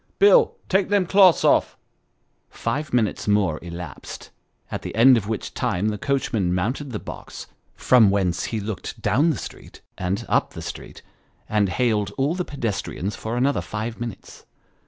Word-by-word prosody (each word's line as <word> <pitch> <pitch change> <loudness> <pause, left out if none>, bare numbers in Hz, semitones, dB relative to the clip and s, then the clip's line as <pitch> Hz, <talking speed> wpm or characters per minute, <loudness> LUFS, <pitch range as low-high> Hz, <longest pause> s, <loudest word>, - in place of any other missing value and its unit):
" - - -39
Bill, 460 +4 +5
take 190 0 +1
them 205 -2 +2
cloths 190 -1 +5
off." - - +3 0.7
Five 150 +2 -3
minutes 115 -4 0
more 100 -7 +2
elapsed: 85 -4 -8 0.4
at - - -4
the - - -7
end 125 +4 +7
of 105 -4 -1
which 110 -3 -4
time 100 +5 0
the 105 -1 -4
coachman 110 -10 0
mounted 125 +10 -2
the 110 - -3
box, - - -9 0.3
from 120 -5 +5
whence 90 -4 0
he 110 - -3
looked 105 +1 -6
down 115 - +2
the 155 - 0
street, - - -10 0.2
and 95 +2 -2
up - - +1
the - - -7
street, - - -8 0.4
and 105 -2 +1
hailed 105 -1 +1
all 140 +4 +1
the 180 0 -2
pedestrians 105 - -4
for 115 +2 -4
another 135 +3 +1
five 110 +2 -5
minutes. 120 -1 -8
110 Hz, 165 wpm, -23 LUFS, 100-135 Hz, 0.7 s, end